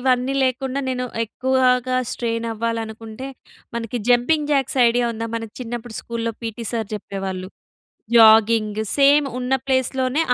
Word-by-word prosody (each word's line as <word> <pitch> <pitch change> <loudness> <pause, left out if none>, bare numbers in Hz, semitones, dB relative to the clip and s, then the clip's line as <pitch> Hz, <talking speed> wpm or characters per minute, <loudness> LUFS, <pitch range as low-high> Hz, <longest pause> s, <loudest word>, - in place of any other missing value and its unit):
ఇవన్నీ 255 +1 +1
లేకుండా, 265 +1 -1
నేను 250 -1 -2 0.2
ఎక్కువాగా 255 +1 +1 0.2
స్ట్రెయినవ్వాలనుకుంటే, 230 +1 -4 0.5
మనకి 235 +1 -3
జంపింగ్ 290 +5 +2
జాక్స్ 270 -2 0
ఐడియా 240 +1 +1
ఉందా? 225 +1 -4
మన 225 - -4 0.2
చిన్నప్పుడు 240 -1 -6
స్కూల్‌లో 230 0 -3
పీటీ 230 +1 -5
సార్ 225 -3 -2
చెప్పేవాళ్ళు. 190 -2 -5 0.7
జాగింగ్ 220 -1 +5 0.2
సేమ్ 285 +1 +5
ఉన్న 250 +1 -1
ప్లేస్‌లోనే 260 +2 +1
240 Hz, 115 wpm, -21 LUFS, 225-260 Hz, 0.7 s, జాగింగ్